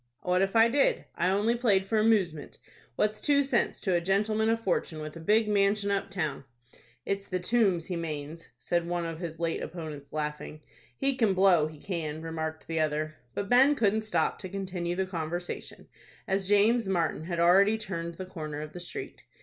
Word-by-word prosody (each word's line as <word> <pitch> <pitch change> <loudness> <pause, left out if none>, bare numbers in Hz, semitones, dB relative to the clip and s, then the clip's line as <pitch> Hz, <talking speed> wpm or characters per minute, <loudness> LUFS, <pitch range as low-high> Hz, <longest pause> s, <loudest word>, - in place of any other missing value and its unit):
"What 180 0 +2
if 195 +3 0
I 225 0 +7
did? 275 +4 +2
I 180 - +1
only 205 +4 +2
played 210 -6 +2
for 220 +2 +1
amoosement. 195 -9 +1 0.4
What's 210 +6 0
two 285 -1 +3
cents 265 -3 0
to 190 - 0
a 175 - +2
gentleman 215 +4 +1
of 225 0 +2
fortune, 175 -4 -1
with 155 +1 -7
a - - -8
big 210 +6 +3
manshun 200 0 +2
up 200 0 -1
town?" 175 -8 -3 0.6
"It's 195 0 -2
the 185 - -2
Tombs, 190 -4 +2
he 180 - -4
manes," 160 -1 -5
said 170 +8 -1
one 175 -1 -1
of 165 -1 -5
his 165 -2 -6
late 165 -1 -1
opponents, 155 -4 -7
laughing. 150 0 -4 0.4
"He 275 -1 +1
can 220 -6 +2
blow, 185 -5 +5
he 155 0 -11
can," 160 -3 -4
remarked 160 -1 -4
the 165 -1 -2
other. 155 0 -1 0.2
But 200 - -2
Ben 265 +6 +5
couldn't 220 -3 +2
stop 175 -7 0
to 185 - -6
continue 180 -2 -3
the 190 +1 0
conversation, 175 -1 -5 0.4
as 195 0 -1
James 210 +2 +4
Martin 165 -3 0
had 170 -1 -3
already 195 +5 +5
turned 170 -6 -5
the 185 - -6
corner 155 -5 -6
of 155 0 -8
the 180 - -7
street. 175 - -7
185 Hz, 190 wpm, -29 LUFS, 165-210 Hz, 0.6 s, I